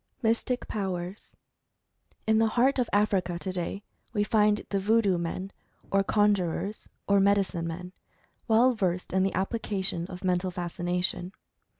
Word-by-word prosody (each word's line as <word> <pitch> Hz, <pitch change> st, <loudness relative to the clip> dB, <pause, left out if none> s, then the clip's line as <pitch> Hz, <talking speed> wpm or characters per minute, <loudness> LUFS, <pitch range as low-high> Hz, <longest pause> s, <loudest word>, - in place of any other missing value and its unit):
MYSTIC 230 Hz, +2 st, 0 dB
POWERS. 190 Hz, -1 st, -4 dB, 0.9 s
In 220 Hz, 0 st, +3 dB
the 225 Hz, -, +4 dB
heart 255 Hz, +5 st, +2 dB
of 245 Hz, -, +1 dB
Africa 195 Hz, -4 st, +1 dB
today, 185 Hz, +2 st, -3 dB, 0.3 s
we 205 Hz, -2 st, +2 dB
find 210 Hz, 0 st, +2 dB
the 200 Hz, -, +1 dB
Voodoo 205 Hz, -2 st, +3 dB
men, 185 Hz, +3 st, -4 dB, 0.4 s
or 195 Hz, 0 st, +3 dB
Conjurers, 205 Hz, -1 st, 0 dB, 0.2 s
or 200 Hz, 0 st, +4 dB
Medicine 195 Hz, -4 st, +2 dB
Men, 180 Hz, +2 st, -6 dB, 0.5 s
well 235 Hz, +3 st, +5 dB
versed 180 Hz, -5 st, -1 dB
in 190 Hz, -, +3 dB
the 190 Hz, +1 st, +1 dB
application 190 Hz, -3 st, -2 dB
of 185 Hz, 0 st, -9 dB
Mental 180 Hz, 0 st, +1 dB
Fascination. 180 Hz, +1 st, -2 dB
195 Hz, 130 wpm, -28 LUFS, 180-210 Hz, 0.9 s, well